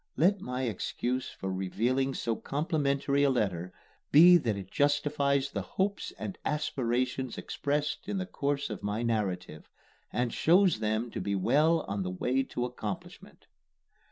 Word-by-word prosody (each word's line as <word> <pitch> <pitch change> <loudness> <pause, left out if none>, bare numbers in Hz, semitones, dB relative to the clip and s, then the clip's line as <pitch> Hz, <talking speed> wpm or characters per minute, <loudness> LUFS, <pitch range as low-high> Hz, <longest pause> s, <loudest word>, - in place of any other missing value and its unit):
Let 185 +7 +3
my 125 +1 -3
excuse 125 +2 -2
for 95 0 -5
revealing 125 +8 0
so 115 -1 -1
complimentary 140 -1 0
a 140 - +4
letter 90 -8 -1 0.4
be 175 +5 +9
that 115 -10 -1
it 95 -1 -8
justifies 145 -1 +1
the - - -2
hopes 200 +1 -2
and 195 - -6
aspirations 130 -3 -1
expressed 150 +6 -2
in 205 - -1
the 185 - -2
course 140 - -2
of 105 - -5
my 105 +3 -2
narrative, 95 -8 -2 0.4
and 120 +1 -1
shows 180 +3 +4
them 110 +2 -1
to - - -4
be 100 +2 -1
well 150 - +3
on 100 -5 -3
the 90 - -2
way 125 +9 0
to 125 -2 -3
accomplishment. 110 -5 -7
130 Hz, 150 wpm, -30 LUFS, 110-145 Hz, 0.4 s, be